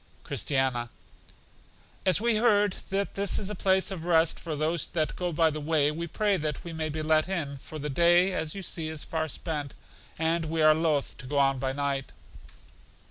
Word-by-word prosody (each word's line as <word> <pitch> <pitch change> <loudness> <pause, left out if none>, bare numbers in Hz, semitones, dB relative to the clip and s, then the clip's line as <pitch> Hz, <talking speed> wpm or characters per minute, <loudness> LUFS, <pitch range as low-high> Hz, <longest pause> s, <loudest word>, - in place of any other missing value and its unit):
Christiana: 130 -4 -1 1.2
As 185 - +4
we 230 0 +2
heard 210 -3 +4 0.2
that 195 +1 -1
this 200 0 +2
is 205 0 -2
a - - -2
place 190 -1 +1
of 180 -4 -5
rest 165 -2 +3
for 160 -3 -4
those 155 +2 0
that 155 -3 -1
go 180 -1 -2
by 160 0 +3
the 155 0 -5
way, 150 -1 +2
we 170 +2 -4
pray 205 +3 +1
that 150 -2 -3
we 170 - -7
may 160 -1 -2
be 155 +1 -3
let 155 +2 +2
in, 150 -7 -3
for 155 +3 -9
the 150 0 -4
day, 175 +5 +4
as 160 -2 -2
you 195 - -6
see, 165 -3 -3
is 155 -1 -6
far 160 -1 -2
spent, 150 -2 -4 0.4
and 165 +1 0
we 160 0 0
are 155 0 +7
loth 155 -3 0
to 125 - -8
go 145 +2 -2
on 135 -1 +3
by 130 0 -1
night. 140 -1 -2
160 Hz, 200 wpm, -28 LUFS, 150-175 Hz, 1.2 s, are